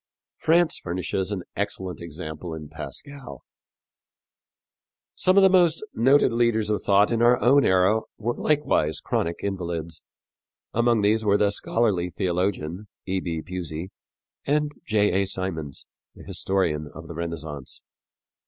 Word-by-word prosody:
France 170 +1 +3
furnishes 90 +2 -3
an 95 -3 -3
excellent 95 -3 -4
example 80 0 -6
in 75 -2 -9
Pascal. 80 - -8 1.7
Some 185 +1 +2
of 200 - +7
the - - +8
most 175 -1 +4
noted 130 +2 +4
leaders 115 -2 +2
of 105 - 0
thought 100 +2 +4
in 115 0 +1
our 120 +1 +5
own 135 +3 +5
era 95 +4 +3 0.2
were 115 +2 -1
likewise 140 - +1
chronic 85 +1 -1
invalids. 85 -4 -4 0.7
Among 120 -2 +2
these 110 +2 +3
were 100 -1 +3
the 105 -1 +2
scholarly 100 -4 0
theologian, 90 +1 -2 0.2
E. 95 0 -1
B. 80 -3 -4
Pusey, 90 0 -5 0.5
and 150 +1 +1 0.2
J. 105 -2 +2
A. 100 - -1
Symonds, 80 -8 -4 0.3
the - - -13
historian 85 -6 -1
of 80 +1 -9
the 85 - -7
Renaissance. 80 -4 -6
95 Hz, 135 wpm, -25 LUFS, 85-115 Hz, 1.7 s, the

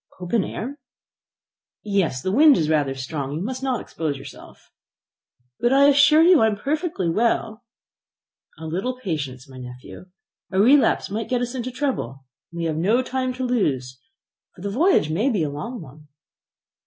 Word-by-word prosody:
"Open 185 +4 0
air?" 280 +6 -6 1.0
"Yes; 190 -11 -1
the 185 - -1
wind 285 +5 +6
is 155 -1 0
rather 145 -3 +1
strong. 135 +1 -5
You 155 - -4
must 255 +4 -4
not 260 -3 -1
expose 155 -4 -4
yourself." 135 - -13 0.9
"But 240 - +2
I 280 +1 +6
assure 290 +3 +6
you 355 -1 +6
I 220 - +5
am 215 - 0
perfectly 290 - -2
well." 225 +4 0 0.9
"A 160 - -9
little 195 +11 -3
patience, 145 - -5
my 130 -1 -12
nephew. 125 +7 -10 0.5
A 190 - 0
relapse 260 0 +4
might 220 +2 -3
get 250 -1 0
us 245 0 -3
into 255 -1 -4
trouble, 240 - -3 0.3
and 170 - -10
we 170 - -2
have 155 -1 -1
no 215 +10 +2
time 255 0 -2
to 255 +1 -5
lose, 130 - -1 0.6
for 180 - -14
the 200 - -3
voyage 275 - +2
may 210 - +1
be 205 -10 0
a 145 - -2
long 225 - -6
one." 150 +2 -15
205 Hz, 170 wpm, -22 LUFS, 155-255 Hz, 1.0 s, wind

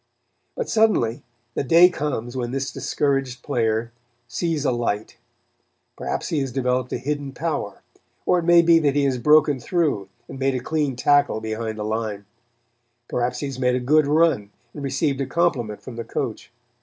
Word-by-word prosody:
But - - -2
suddenly 215 - +2 0.3
the - - -1
day 165 +6 +7
comes 140 -8 -3
when 120 -2 -2
this 135 +1 -3
discouraged 135 -4 -1
player 115 -3 0 0.4
sees 150 +4 -2
a - - +3
light. 115 -3 -2 0.8
Perhaps - - -3
he 155 - 0
has 135 -2 -2
developed 125 0 -1
a - - -1
hidden 140 +2 -3
power, 145 -10 -3 0.4
or 180 - +3
it 170 - -4
may 170 0 +6
be 165 0 +6
that 145 -3 +1
he 145 - +2
has 130 -2 +1
broken 150 +1 +4
through 145 - -1 0.2
and 135 - -9
made 135 0 +1
a - - 0
clean 145 0 -1
tackle 145 -1 +3
behind 110 0 -4
the 105 - -3
line; 110 -2 -3 0.8
perhaps 125 +1 -1
he - - -2
has 135 -2 -5
made 125 -1 +2
a - - 0
good 145 +4 +3
run 150 -9 +2 0.2
and 145 - -8
received 140 +1 0
a 135 - -2
compliment 130 -10 0
from 125 -3 -9
the 115 - -3
coach. - - -4
135 Hz, 180 wpm, -23 LUFS, 120-150 Hz, 0.8 s, day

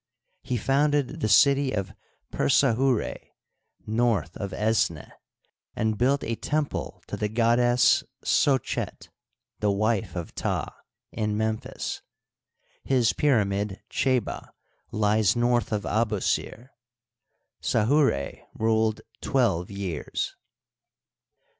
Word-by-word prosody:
He 125 - -2
founded 145 +3 +1
the 110 - +1
city 140 +6 +5
of 100 -3 -3 0.4
Persahurd, 130 -2 +2 0.7
north 110 -7 0
of 100 -2 -4
Esneh, 105 - 0 0.6
and 110 0 0
built 135 +5 +1
a 115 - -2
temple 150 +5 -3
to - - -5
the 105 - -2
goddess 120 +2 +3 0.2
Socket, 135 -4 0 0.5
the 105 - +1
wife 100 -2 0
of 85 -2 -5
Ptah, - - -2 0.4
in 105 -2 -2
Memphis. 110 0 -3 0.8
His 125 -4 +2
pyra 130 -8 +3
mid, 100 0 -3
Chdba, 130 -4 -1 0.4
lies 105 -2 +2
north 120 0 +1
of 105 -2 -1
Abusir. 110 +2 -1 0.9
Sahura 115 - +2 0.2
ruled 110 -1 +1 0.2
twelve 100 -10 +1
years. 100 -4 -4
110 Hz, 95 wpm, -26 LUFS, 105-125 Hz, 0.9 s, city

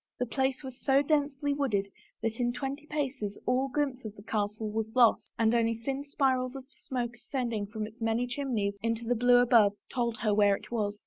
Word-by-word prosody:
The 250 - 0
place 265 +2 -1
was 260 -1 -9
so 275 +1 +4
densely 285 -1 +1
wooded 230 -9 0 0.4
that 225 +1 -2
in 240 0 +1
twenty 280 +3 -5
paces 265 -9 -3
all 255 +2 +2
glimpse 270 -1 -1
of 215 -1 -7
the 205 - -13
castle 210 0 -2
was 220 0 -3
lost 240 -3 +4
and 225 0 +3
only 230 -1 +2
thin 270 +5 -3
spirals 260 -2 0
of 265 -1 -7
smoke 245 -4 -4
ascending 235 -5 -3
from 215 0 -4
its 220 +2 -13
many 225 +2 +1
chimneys 240 -6 -2
into 230 0 -1
the 240 - +2
blue 245 +1 +5
above 235 -4 +5 0.2
told 235 -2 0
her 215 -2 +2
where 205 -1 +5
it - - -12
was. 210 -3 -1
240 Hz, 200 wpm, -30 LUFS, 220-265 Hz, 0.4 s, blue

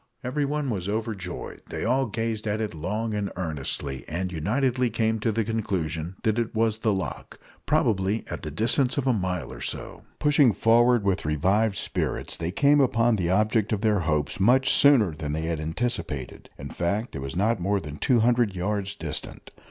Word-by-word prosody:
Everyone 145 +1 -1
was 95 -3 -3
overjoyed. 110 -2 -4
They - - -4
all 130 +3 +2
gazed 115 0 -3
at 105 +1 -1
it 110 -4 -2
long 105 +8 -3
and 105 -1 -2
earnestly, 70 -6 -4
and 90 +3 -3
unitedly 125 - 0
came 110 0 0
to 110 +2 0
the 115 +1 0
conclusion 90 -6 -2
that 110 0 +1
it 115 -1 -2
was 110 0 +1
the 110 -1 +1
loch 95 -7 -5 0.3
probably 100 +1 +1
at 85 - -5
the 80 - -5
distance 120 - +2
of 140 - 0
a 130 - +3
mile 90 -5 -2
or - - -10
so. - - -5 0.2
Pushing 145 -5 +4
forward 120 +1 +4
with 100 -1 0
revived 95 +8 +1
spirits, - - -2
they 80 +1 -3
came 145 +7 +4
upon 120 -3 +3
the 90 -4 -1
object 110 +2 +2
of 105 -2 0
their 105 -3 +2
hopes 75 -2 -1
much 125 +7 +4
sooner 130 - +5
than 75 -1 -4
had 80 +1 -2
been 75 - -4
anticipated. 80 - -3
In 70 +1 -7
fact, 100 +6 -2
it - - -3
was 70 +3 -5
not 105 +4 +1
more 100 +3 +1
than 75 -4 -8
two 120 - +2
hundred 120 -3 +2
yards 100 +2 -2
distant. 80 -6 -6
105 Hz, 185 wpm, -26 LUFS, 85-115 Hz, 0.3 s, sooner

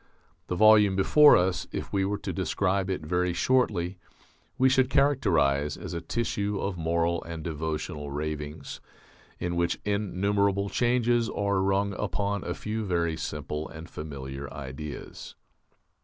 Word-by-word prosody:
The 90 - -2
volume 105 -1 +6
before 145 +10 +7
us, 90 0 0
if - - -5
we 95 -1 +2
were 100 +1 -1
to - - -5
describe 95 -1 0
it 95 - -2
very 90 +2 0
shortly, 95 -5 +1 0.6
we 130 0 +5
should 130 -1 +3
characterize 85 - +2
as - - -7
a 85 - -3
tissue 105 -1 -2
of 100 -2 -2
moral 85 0 0
and 85 -1 -7
devotional 75 -2 -4
ravings, 75 +1 -5 0.6
in 85 0 -3
which 85 0 0
innumerable 100 0 0
changes 120 -1 +2
are 100 -2 0
rung 100 +1 +1
upon 100 0 -1
a - - -3
few 110 +1 -3
very 85 -4 0
simple 75 -1 -4
and 80 +2 -10
familiar 70 -2 -7
ideas. 70 +1 -8
90 Hz, 140 wpm, -27 LUFS, 80-100 Hz, 0.6 s, before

